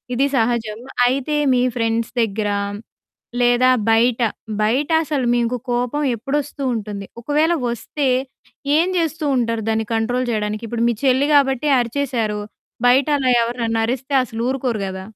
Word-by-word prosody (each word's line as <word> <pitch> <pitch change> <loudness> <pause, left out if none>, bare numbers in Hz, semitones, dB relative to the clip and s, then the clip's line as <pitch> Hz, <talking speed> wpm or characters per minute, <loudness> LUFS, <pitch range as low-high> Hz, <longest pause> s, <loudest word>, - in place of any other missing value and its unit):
ఇది 275 +3 +2
సహజం. 225 -2 0 0.3
అయితే 275 +4 -1 0.2
మీ 245 - +2
ఫ్రెండ్స్ 230 -1 -1
దగ్గర, 210 -1 -1 0.9
లేదా 245 +1 +4 0.2
బయట 230 +2 +3 0.4
బయటసలు 285 +2 +1
మీకు 240 +1 0 0.2
కోపం 245 +4 -1
ఎప్పుడొస్తూంటుంది? 245 -6 -3 0.2
ఒకవేళ 305 +6 +2 0.2
ఒస్తే, 265 +5 -3 0.7
ఏం 340 +3 +3
జేస్తూంటారు, 275 -9 0
దాన్ని 220 0 0
కంట్రోల్ 245 +3 0
జేయడానికి. 215 +1 -2
ఇప్పుడు 235 +1 -2
మీ - - +1
చెల్లి 270 +2 +3
గాబట్టి 270 0 +2
అరిచేశారు. 235 -4 -1 0.5
బయట 265 +3 +4
అలా 260 -2 0
ఎవరినన్నా 230 -1 -1
అరిస్తే, 260 +3 -3
అసలు 225 -1 -6
ఊరుకోరు 250 -5 -2
గదా! 190 0 -6
245 Hz, 125 wpm, -20 LUFS, 225-275 Hz, 0.9 s, లేదా